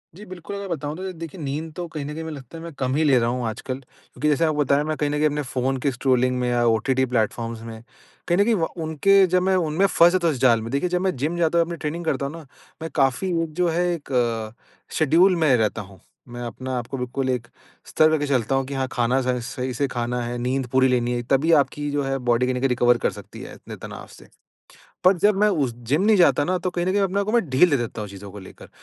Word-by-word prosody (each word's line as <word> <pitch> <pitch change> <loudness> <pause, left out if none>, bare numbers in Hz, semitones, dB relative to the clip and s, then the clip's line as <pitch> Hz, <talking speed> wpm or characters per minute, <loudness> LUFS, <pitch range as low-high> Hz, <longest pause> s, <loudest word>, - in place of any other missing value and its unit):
जी, 205 +4 -11
बिल्कुल 185 +1 -8
अगर 200 0 -5
बताऊँ 150 -3 -4
तो 190 - -5
अ, - - -5
देखिए 165 0 -9
नींद 150 +3 -4
तो 175 -1 -5
कहीं 150 -3 -6
न 150 - -5
कहीं 160 +1 -6
में 160 - -6
लगता 140 +2 -10
है 165 - -9
मैं 170 - -7
कम 130 0 0
ही 160 - +2
ले 140 -4 +4
रहा 115 0 +1
हूँ 125 0 -2
आजकल, 130 +4 -5
क्योंकि 135 +1 -7
जैसे 150 +3 +2
आपको 155 -2 0
बताया 140 +1 +2
मैं 155 +1 -2
कहीं 150 - 0
न - - -2
कहीं 150 - +2
अपने 150 0 0
फ़ोन 130 +1 -1
के 140 - +3
स्ट्रॉलिंग 125 0 +1
में 125 0 0
या 120 0 +1
ओटीटी 125 +4 +2
प्लेटफॉर्म्स 115 -1 -2
में 115 -1 -9 0.5
कहीं 175 - +2
न 200 - +5
कहीं 230 0 +2
व 165 -3 0 0.2
उनके 195 +6 +4
जब 180 +1 +2
मैं 190 0 +2
उनमें 170 +2 +1
फँस 175 0 +5
था - - +3
उस 140 - -2
जाल 120 -3 +4
में 115 - -6
देखिए 140 +6 0
जब 180 0 0
मैं 190 -3 0
जिम 155 +6 -2
जाता 170 0 +1
हूँ 170 - +3
अपनी 170 0 -6
ट्रेनिंग 165 +2 -4
करता 140 -3 -1
हूँ 140 - -5
ना, 165 -2 -10 0.4
मैं 160 - -4
काफ़ी 135 +4 +1 0.2
एक 155 -2 -7
जो 180 +1 +1
है 175 +2 0
एक 120 -7 -2 0.4
शेड्यूल 170 +5 +4
में 155 -6 +3
रहता 110 0 0
हूँ। 95 -1 -14 0.3
मैं 120 0 -7
अपने 130 +2 -6
आप 125 -2 -3
को 135 - -5
बिल्कुल 130 +1 -3
एक 120 -2 -2 0.4
स्तर 155 - +3
करके 155 -2 +1
चलता 135 -1 +1
हूँ 135 - 0
कि 140 - -6
हाँ, 135 -1 -1
खाना 125 +2 +1
स 125 - -4 0.3
सही 130 -1 -3
से 140 +3 0
खाना 120 0 -3
है, 120 +1 -4
नींद 125 +1 -1
पूरी 130 0 +4
लेनी 125 -1 +1
है 120 - -1
तभी 140 +5 +3
आपकी 145 +2 -4
जो 145 -1 0
है 135 0 -1
बॉडी 125 -1 +1
कहीं 125 0 -1
न - - -2
कहीं 135 +1 +1
रिकवर 120 -1 +3
कर - - 0
सकती - - -11
है - - -9
इतने - - -10
तनाव - - -9
से। - - -15 0.8
बट 185 0 +6
जब 205 -1 +4
मैं 210 - +5
उस 145 -10 0 0.2
जिम 150 +6 +2
नहीं 220 - +5
जाता 170 -4 +4
ना 185 +4 0
तो 185 - +1
कहीं 175 0 -2
न 185 - +1
कहीं 205 - +1
अपने 195 0 0
आप 200 - -1
को 215 - -2
मै 240 - +4
ढील 150 +1 +3
दे 145 - +2
देता 115 -2 -4
हूँ 105 - -6
चीज़ों 100 +1 -10
को 105 - -9
लेकर, 95 - -13
140 Hz, 275 wpm, -23 LUFS, 125-165 Hz, 0.8 s, बट